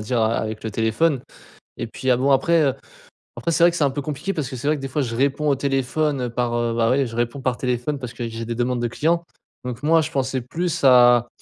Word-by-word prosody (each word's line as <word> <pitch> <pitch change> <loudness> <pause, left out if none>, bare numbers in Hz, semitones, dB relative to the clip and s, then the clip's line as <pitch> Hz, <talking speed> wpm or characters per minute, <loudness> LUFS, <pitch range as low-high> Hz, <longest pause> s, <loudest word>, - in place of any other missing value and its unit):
dire 115 +3 -1
a 110 +1 +2
avec 110 0 -4
le 110 - -4
téléphone. 115 +7 +1 0.6
Et 120 - -3
puis 130 +3 -3
ah 125 - +4
bon 135 +2 +3
après 160 +4 +3 0.7
après 170 - -2
c'est 165 +1 +2
vrai 175 - +5
que - - -6
c'est 155 - +1
un 140 - +3
peu 145 +2 -4
compliqué 150 +6 -3
parce 150 -8 -3
que 130 - -6
c'est 125 +3 -5
vrai 155 0 +2
que - - -9
des 135 - -4
fois 145 +3 -1
je 120 -4 -3
réponds 140 +4 +1
au 140 - +3
téléphone, 135 +1 -1
heu, 125 - -2
par, 120 0 -1
heu, 120 -1 0
bah, 115 -1 +2
ouais 135 +2 +2
je 115 -2 -7
réponds 120 +3 -2
par 130 -2 -1
téléphone 125 +3 -2
parce 125 -2 -7
que 120 - -5
j'ai 115 0 -6
des 115 +1 -4
demandes 120 +1 -1
de 120 - 0
clients. 170 +7 0 0.4
Donc 125 +1 -6
moi 165 +2 +4
je 160 0 -1
pensais 130 -3 -1
plus 165 +6 -3
à, 120 -2 +6
130 Hz, 270 wpm, -22 LUFS, 120-150 Hz, 0.7 s, à